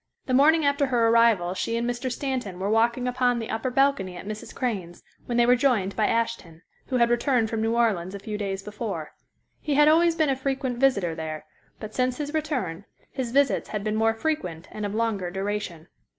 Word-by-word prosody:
The 255 - -2
morning 305 +4 +5
after 285 0 +2
her 235 -3 +2
arrival 225 -6 +4
she 230 +4 -2
and 235 +1 -1
Mr. 245 +1 -2
Stanton 250 -8 -3
were 195 +3 -2
walking 235 +3 +2
upon 250 -1 +1
the 225 -2 -4
upper 225 +3 -2
balcony 250 -9 +1
at - - -9
Mrs. 215 +1 -7
Crane's, 195 -9 -3 0.2
when 240 - -1
they 240 - +5
were 245 +1 +5
joined 235 -7 +1
by 215 - +2
Ashton, 210 -8 -2 0.2
who 255 - 0
had 235 -1 +3
returned 240 -2 +1
from 225 -1 -1
New 225 +1 0
Orleans 200 -6 +1
a - - -6
few 210 +1 -6
days 195 -2 -3
before. 205 -7 -5 0.5
He 295 -2 -1
had 295 +1 +6
always 330 +2 +4
been 315 -3 +2
a - - +1
frequent 265 -2 -2
visitor 200 -11 +2
there, 155 -1 -6 0.3
but 215 0 -8
since 255 0 0
his 295 0 -4
return, 255 - -2 0.3
his 260 -3 -3
visits 280 +3 +2
had 210 -2 -3
been 215 0 -1
more 225 +1 +2
frequent 185 - -3
and 210 -1 -4
of 205 - -5
longer 220 -5 -1
duration. 195 -3 -4
230 Hz, 210 wpm, -25 LUFS, 200-260 Hz, 0.5 s, had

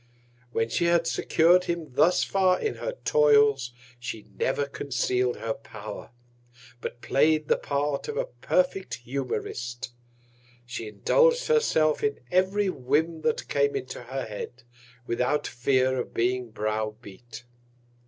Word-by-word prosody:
When 115 -2 0
she 170 +9 0
had 170 -1 +3
secur'd 175 +2 +3
him 170 -6 -4
thus 160 +7 +4
far 185 -2 +2
in 435 - -2
her - - -3
Toils, 145 -4 +4 0.3
she 120 -3 -6
never 140 +2 0
conceal'd 125 -3 -1
her 115 0 -3
Power, 105 -2 -9 0.7
but 120 - -6
play'd 155 +2 +2
the - - +4
Part 140 0 -2
of 450 - -4
a - - 0
perfect 275 - -1
Humourist. 120 -2 -4 0.7
She 120 -2 -6
indulg'd 485 - +3
herself 450 - +2
in 430 0 0
every 190 +3 +2
Whim 155 +1 0
that 235 - -1
came 140 0 +1
in - - -2
her 130 +2 -5
Head, 110 +3 -7 0.4
without 125 +6 0
Fear 130 +1 +1
of - - -5
being 125 +1 0
brow 110 0 -2
beat. 120 +1 -12
140 Hz, 135 wpm, -27 LUFS, 120-170 Hz, 0.7 s, thus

